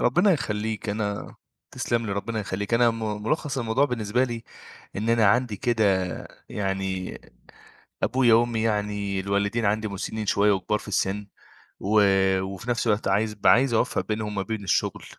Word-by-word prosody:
ربنا 175 +11 +4
يخلّيك 110 - -2
أنا 105 -1 -3 0.4
تسلم 115 -1 -1
لي، 100 - -2
ربنا 110 +2 -3
يخلّيك 100 +2 -2
أنا 120 0 +5
م 110 -2 -4
ملخص 145 +3 -1
الموضوع 120 +3 +2
بالنسبة 125 -2 0
لي 120 -2 -5 0.5
إن 110 +3 -2
أنا 115 -2 +4
عندي 120 0 +2
كده 115 +1 +1 0.6
يعني 95 -2 -3 0.8
أبويا 125 -3 +4
وأمي 115 -1 +2
يعني 105 -3 -1
الوالدين 100 +4 0
عندي 110 +1 +1
مسنين 105 +2 -4
شوية 100 +1 +3
وكبار 105 +2 0
في - - -12
السن، 100 +1 -1 0.5
و 105 +1 +3 0.4
وفي 95 +5 -5
نفس 120 0 0
الوقت 105 -2 +1
عايز 105 +2 +1
ب 100 - -5
عايز 125 0 +5
أوفّق 120 - 0
بينهم 105 -1 -3
ما 100 - -1
بين 105 +1 -4
الشغل 95 - 0
110 Hz, 160 wpm, -25 LUFS, 100-115 Hz, 0.8 s, أنا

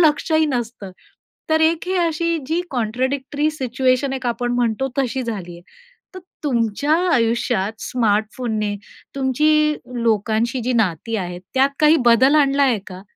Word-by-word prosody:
लक्ष 310 0 +2
ही 315 0 +4
नसतं. 235 -7 -4 0.6
तर 315 - +3
एक 325 +2 +2
ही 375 - 0
अशी 335 -1 0
जी 325 +4 0
कॉन्ट्राडिक्टरी 265 +5 -1
सिच्युएशन 260 -1 0
एक 260 -2 -4
आपण 240 +1 -1
म्हणतो, 245 +2 0
तशी 265 -1 0
झाली 200 -7 -5
आहे. 170 - -13 0.5
तर 370 - -7 0.3
तुमच्या 245 +3 +1 0.2
आयुष्यात 230 -3 0
स्मार्टफोनने 215 -1 -1 0.4
तुमची 300 +3 +2 0.3
लोकांशी 225 +2 0
जी 255 - 0
नाती 220 0 0
आहेत, 180 -3 -5
त्यात 270 +1 +3
काही 305 +1 +6
बदल 260 +5 +5
आणला 280 -1 +3
आहे 255 -5 +3
का? 185 -1 -9
255 Hz, 140 wpm, -20 LUFS, 225-290 Hz, 0.6 s, काही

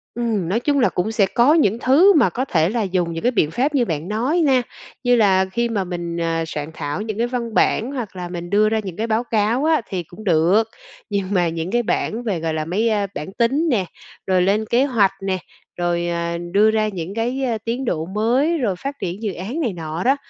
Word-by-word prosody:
Ừm, 225 -7 -1
nói 210 +5 +1
chung 285 +3 +1
là 245 - +4
cũng 185 +5 -2
sẽ 220 -3 +3
có 240 +8 +3
những 235 - +2
thứ 310 +12 +5
mà 290 -9 +4
có 260 - -2
thể 165 -8 +2
là 230 +2 -1
dùng 180 -3 -1
những 165 - -5
cái 245 - +3
biện 155 -9 +1
pháp 275 - 0
như 250 -3 +3
bạn 160 -3 -3
nói 250 - 0
na, 265 -3 +4 0.4
như 245 -1 +4
là 195 -4 +4
khi 235 +3 0
mà 210 -4 -1
mình, 175 -2 -5
à, 165 0 0
soạn 150 0 -5
thảo 145 +3 -4
những 215 -1 -4
cái 235 +1 +1
văn 240 -2 -4
bản, 230 +4 +2
hoặc 240 -9 -5
là 180 -1 -5
mình 175 -1 -6
đưa 210 +2 +3
ra 220 0 +1
những 185 -4 -7
cái 225 +2 -1
báo 225 +1 +1
cáo 230 +4 +1
á 315 -4 +3
thì 185 -2 -3
cũng 175 +6 -13
được. 185 +4 +3 0.4
Nhưng 200 -2 -1
mà 175 -3 +2
những 165 +2 -4
cái 240 +1 +1
bảng 230 +1 -1
về, 205 -7 -1
gọi 160 0 -2
là, 155 -1 -2
mấy, 205 +8 0
a, 205 -2 0
bảng 150 +6 -6
tính 265 +9 +1
nè, 215 -9 +1 0.4
rồi 185 -1 +3
lên 200 +4 +2
kế 240 +5 +2
hoạch 225 -8 +3
nè, 190 -1 -1 0.4
rồi, 175 0 0
à, 170 0 -2
đưa 210 +3 +4
ra 215 -1 +1
những 185 -2 -5
cái, 245 +4 -1
ờ, 240 -4 0
tiến 240 +3 -2
độ 160 -8 -1
mới, 240 - +1
rồi 225 -10 0
phát 275 +10 -5
triển 185 +4 -4
dự 205 -3 -1
án 200 - -5
này 245 - -1
nọ 160 -1 -5
đó, 265 +3 +4
210 Hz, 245 wpm, -21 LUFS, 175-240 Hz, 0.4 s, thứ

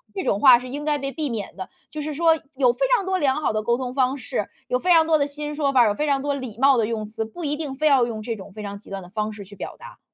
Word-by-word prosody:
这 380 - -2
种 200 - +1
话 255 -3 +8
是 250 +1 -8
应 290 +3 -5
该 300 -1 +1
被 275 -1 -4
避 305 -2 -2
免 220 -4 -5
的， 190 - -6 0.2
就 305 - -5
是 300 +1 -4
说 325 0 +4 0.2
有 255 -3 +4
非 - - -22 0.2
常 400 -5 -1
多 375 0 0
良 270 -4 +2
好 300 -7 -1
的 215 - 0
沟 235 +3 +1
通 255 -1 -4
方 265 0 +1
式， 215 -4 -3 0.2
有 250 0 0
非 360 - +1
常 325 -2 +6
多 320 -1 +3
的 285 - +1
新 295 +1 -5
说 290 -2 0
法， 245 -3 +6
有 205 - +2
非 300 +6 -2
常 275 -1 +1
多 290 0 0
礼 255 -6 -6
貌 270 0 +5
的 220 -2 +2
用 220 -2 -3
词， 220 +1 -4
不 320 +10 -9
一 295 0 0
定 295 -4 -5
非 305 +3 -2
要 265 -5 +5
用 215 -2 -5
这 230 -1 -3
种 195 -1 -11
非 215 - -8
常 200 0 -6
极 - - -16
端 195 -2 -5
的 175 - -13
方 215 +1 -2
式 205 -1 -9
去 205 +1 -13
表 - - -7
达。 - - -13
265 Hz, 350 characters per minute, -23 LUFS, 220-295 Hz, 0.2 s, 话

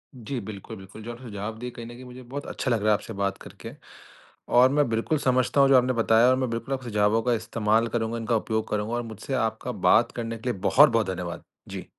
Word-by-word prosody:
जी, 125 +2 -5
बिल्कुल, 110 +1 -8
बिल्कुल 95 +3 -12
जो 120 - -6
आपने 120 +2 -10
सुझाव 105 +2 -5
दिए 125 0 -5
कहीं 115 0 -9
न - - -9
कहीं 125 - -11
मुझे 125 +1 -11
बहुत 140 +4 -7
अच्छा 130 - -3
लग 115 - +2
रहा 110 - +3
है - - +6
आपसे 105 +2 -3
बात 100 0 0
करके - - -10 0.9
और 130 +1 +7
मैं 145 -1 +2
बिल्कुल 115 +8 0
समझता 130 +1 +2
हूँ 135 - +5
जो 135 - +7
आपने 125 0 +2
बताया 115 0 +4
और 130 - +4
मैं 130 -2 -1
बिल्कुल 115 +4 -3
अब 130 - -8
सुझावों 105 -1 +1
का 125 -1 +2
इस्तेमाल 110 0 +1
करूँगा, 115 0 -2
इनका 115 0 -1
उपयोग 110 0 -1
करूँगा, 105 +2 -2
और 120 - -1
मुझसे 115 +4 -7
आपका 110 -3 -1
बात - - +3
करने 115 -1 -5
के 125 +3 -4
लिए 100 - -3
बहुत-बहुत 115 0 +4
धन्यवाद। 90 -2 -5 0.3
जी। - - -6
115 Hz, 240 wpm, -25 LUFS, 110-125 Hz, 0.9 s, और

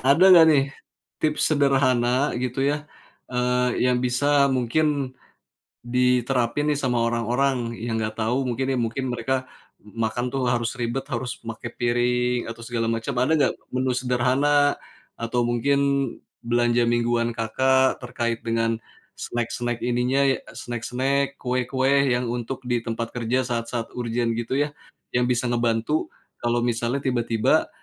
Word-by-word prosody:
ada 140 +7 +4
nggak, 165 -2 +9
nih, 140 -3 +5 0.6
tips 155 0 +1
sederhana 135 -2 +2
gitu 130 +2 -1
ya, 150 +1 -1 0.4
eee, 125 0 +1
yang 125 -1 +2
bisa 140 +3 +3
mungkin 135 +2 0 0.7
diterapin 125 +2 +1
nih - - -2
sama 125 -2 0
orang-orang 120 +1 0
yang 115 0 -2
enggak 110 0 -3
tahu, 115 +4 0
mungkin 125 +2 -1
nih, 130 - 0
mungkin, 115 +3 -2
mereka 130 +2 -1 0.3
makan 110 +3 -3
tuh 130 -2 0
harus 120 -1 0
ribet, 120 +1 -3
harus 125 0 -3
pakai 115 +1 -6
piring 125 +1 +1
atau 115 0 -8
segala 115 -1 -1
macam. 115 +4 -2
Ada 130 +5 +2
nggak 145 - +2 0.2
menu 130 0 +1
sederhana 130 +4 +2 0.4
atau 115 +1 -1
mungkin 120 +4 +1 0.6
belanja 120 0 +2
mingguan 120 0 +1
Kakak 130 +5 +2
terkait 120 -2 -3
dengan 115 -1 0 0.4
snack-snack 120 0 -3
ininya 125 +3 +2 0.2
snack 120 -1 -5
snack, 135 +3 -1
kue-kue, 130 +2 +1
yang 125 0 +1
untuk 120 +2 -4
di 120 -1 0
tempat 115 0 -4
kerja 125 +2 0
saat-saat 115 -1 -3
urgent 120 -1 -1
gitu 120 +3 -2
ya, 145 - -9 0.4
yang 125 0 +2
bisa 125 0 +1
ngebantu 120 +4 0 0.3
kalau 120 0 +1
misalnya 120 +3 -1
tiba-tiba, 120 -3 +1
125 Hz, 135 wpm, -24 LUFS, 120-130 Hz, 0.7 s, nggak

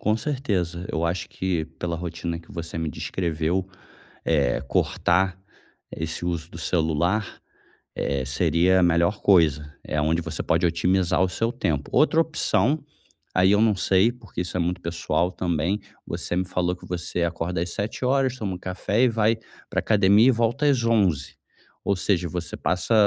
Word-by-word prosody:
Com 105 +1 +2
certeza. 100 - -2
Eu 80 - -1
acho 85 +2 -2
que 90 -4 -2
pela 85 -1 -2
rotina 85 0 -4
que 85 - -16
você 85 0 -6
me 80 -2 -2
descreveu, 85 +3 -2 0.6
eh, 70 -6 +2
cortar 95 +1 +1 0.5
esse 80 +2 -3
uso 85 -1 -3
do 85 - -9
celular, 85 +5 0 0.6
eh, 70 -2 -1
seria 85 +7 +3
a 90 - +4
melhor 85 +4 +2
coisa. 75 -6 +3
É 75 - -2
onde 80 +3 +1
você 80 -1 -4
pode - - +2
otimizar 90 +1 +2
o 95 - +4
seu 115 +5 -1
tempo. 80 - -2
Outra 155 +4 +4
opção, 150 -3 +1 0.5
aí 95 +1 +4
eu 105 +1 +4
não 110 -2 +4
sei, 95 +4 +3
porque 110 -7 -7
isso 90 0 -5
é - - 0
muito 90 +1 -1
pessoal 85 +1 -1
também, 90 +2 -1 0.3
você 85 - -3
me 90 +1 0
falou 90 -1 0
que - - -14
você 85 0 -2
acorda 85 +1 -2
às 85 0 -3
7:00 130 +5 0
toma 100 -5 -3
um - - -9
café 95 +5 0
e 125 - +5
vai 110 0 +2 0.3
pra - - 0
academia 105 +2 +5
e 130 - +7
volta 120 +5 0
às 130 -5 +3
11:00. 95 - +1 0.5
Ou 100 - +1
seja, 90 -1 0
você 85 -1 -4
passa 90 +5 0
90 Hz, 170 wpm, -24 LUFS, 85-105 Hz, 0.6 s, e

